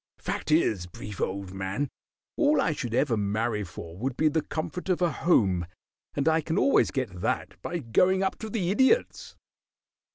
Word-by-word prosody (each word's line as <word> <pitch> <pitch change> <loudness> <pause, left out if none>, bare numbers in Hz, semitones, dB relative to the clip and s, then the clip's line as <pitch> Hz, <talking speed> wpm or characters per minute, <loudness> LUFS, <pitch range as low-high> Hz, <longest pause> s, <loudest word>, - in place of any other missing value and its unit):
"Fact - - -4
is, 110 - +2
Brief, 100 +3 -8
old 95 0 -3
man, 95 +9 -3 0.4
all 300 -1 +3
I - - +2
should 120 -6 -3
ever 130 -2 +2
marry 105 +1 -1
for 85 -2 -9
would 125 +6 -3
be 155 - +4
the 160 +1 +1
comfort 175 +5 -5
of 180 - +2
a 175 -2 +2
home, 95 - +2 0.5
and 140 +1 0
I 160 0 +4
can 160 +3 -2
always 275 - +4
get 115 -10 -3
that - - -2
by 175 - -3
going 180 +8 +2
up 190 - -1
to 220 - -5
the 190 -5 -1
Idiot's." 265 - +2
135 Hz, 175 wpm, -27 LUFS, -, 0.5 s, be